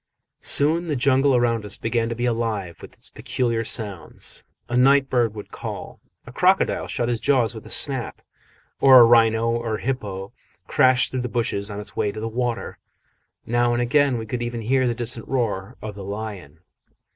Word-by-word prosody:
Soon 160 +4 +3
the 150 - -1
jungle 135 +1 +3
around 120 -2 +1
us 105 -1 -5
began 115 0 -1
to 115 - -3
be 120 +1 -2
alive 115 -7 -2
with - - -11
its - - -7
peculiar 115 -3 -1
sounds 105 -6 -4 0.2
a 120 - -3
night 135 +2 +4
bird 120 -4 +1
would 105 - -9
call, - - -7 0.3
a - - -10
crocodile - - +2
shut 120 - -2
his 120 -2 -1
jaws 125 -5 +2
with 110 - -10
a - - -11
snap, 135 -5 -3 0.6
or 130 -2 +8
a - - +9
rhino 115 -1 +4
or 115 -2 -2
hippo 100 -6 -4 0.3
crash 130 0 +3
through 130 - -2
the 125 - -3
bushes 110 -4 -1
on 105 0 -6
its 105 - -9
way 105 - 0
to 110 - -7
the 110 - -3
water: 120 +1 -3 0.7
now 120 +1 +1
and 120 - 0
again 140 0 +2
we 110 - -5
could 120 +3 -4
even 120 -1 -3
hear 130 +3 +2
the 120 - 0
distant 120 -1 -3
roar 110 -7 -2
of 110 -1 -5
the 100 -1 -9
lion. 100 -6 -7
120 Hz, 190 wpm, -23 LUFS, 110-125 Hz, 0.7 s, a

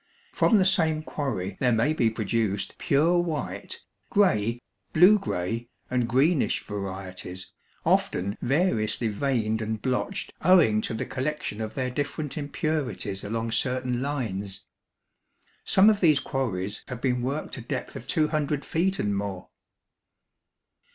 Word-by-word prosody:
From 225 - +4
the 190 - +4
same 160 -5 +2
quarry 100 -12 -3
there 125 - +3
may 115 +7 +2
be 120 -7 +2
produced 110 -2 -1
pure 165 +5 +3
white, 165 -4 -3 0.3
gray, 120 - +2 0.3
blue 185 +6 +7
gray, 115 - -3 0.2
and 125 -2 +1
greenish 140 +6 +2
varieties, 95 -2 -6 0.3
often 100 +3 +1
variously 120 - +1
veined 110 -1 0
and 110 0 -2
blotched 130 +2 -2
owing 155 -12 +5
to 110 - -3
the - - -3
collection 130 -5 -3
of 110 -1 -5
their 130 -2 -1
different 145 +2 -3
impurities 145 - -2
along 115 +2 -2
certain 125 +1 0
lines. 105 -9 -3 1.0
Some 190 +2 +5
of 215 -2 +5
these 155 -6 +5
quarries 105 -10 -3
have 125 - -6
been 125 -1 0
worked 140 +5 -3
a - - -6
depth 115 - -5
of 120 - -8
two 155 -1 +2
hundred 150 -2 -1
feet 190 +4 0
and 100 - 0
more. 100 -2 -4
125 Hz, 135 wpm, -26 LUFS, 110-155 Hz, 1.0 s, blue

